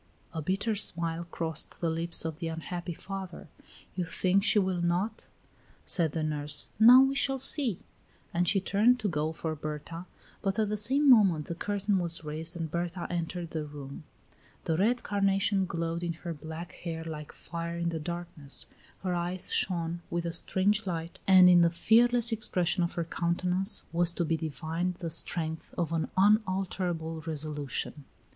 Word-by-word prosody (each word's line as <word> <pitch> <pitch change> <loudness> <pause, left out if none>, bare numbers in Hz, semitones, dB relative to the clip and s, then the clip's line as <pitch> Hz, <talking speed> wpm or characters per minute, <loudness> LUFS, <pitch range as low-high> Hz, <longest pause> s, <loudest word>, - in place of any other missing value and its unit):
A 160 - -3
bitter 195 +7 -1
smile 170 -4 -1
crossed 165 -2 -3
the 165 -2 0
lips 165 +1 -2
of 160 -1 -4
the 170 - -3
unhappy 170 +1 -5
father. 190 -2 -7 0.5
"You 180 - -1
think 185 +3 +1
she 210 - +3
will 185 -3 +1
not?" 180 +6 -1 0.6
said 165 -5 0
the 160 - -2
nurse. 150 -1 -1
"Now, 245 +4 +9
we 270 0 +1
shall 270 0 +1
see." 260 - +1 0.5
And 175 +1 +1
she 195 +3 +3
turned 215 +6 +3
to 215 - 0
go 155 -3 -1
for 160 0 -4
Berta, 155 +4 -6 0.3
but 195 +1 -1
at 215 -2 +1
the 210 - -1
same 265 +8 +2
moment 195 - +5
the - - -4
curtain 205 +2 -1
was 170 -2 -1
raised 155 +3 -3
and 165 -2 -4
Berta 175 +1 -3
entered 170 0 -3
the 155 -2 -3
room. 145 -1 -9 0.6
The 160 - 0
red 230 +8 +1
carnation 195 -1 +1
glowed 165 0 -3
in 170 -1 -2
her 170 +1 -6
black 160 +3 -8
hair 165 -2 -6
like 155 -2 -7
fire 170 0 -6
in 170 0 -1
the 165 -1 -3
darkness; 170 -3 -5 0.4
her 185 -2 -1
eyes 175 +1 -3
shone 170 -2 0
with 170 0 -2
a 170 - -3
strange 200 +5 +1
light, 165 -1 -4
and 185 -1 +8
in 175 -1 +7
the 170 - +5
fearless 235 +7 +5
expression 185 -5 0
of 170 - 0
her 170 - -2
countenance 180 +4 +3
was 170 0 +2
to 170 - 0
be 160 +1 +1
divined 160 +3 -3
the 170 -1 -5
strength 160 -1 -3
of 170 -1 -1
an 160 -1 -1
unalterable 185 -5 +1
resolution. 150 -2 -3
170 Hz, 170 wpm, -29 LUFS, 165-195 Hz, 0.6 s, Now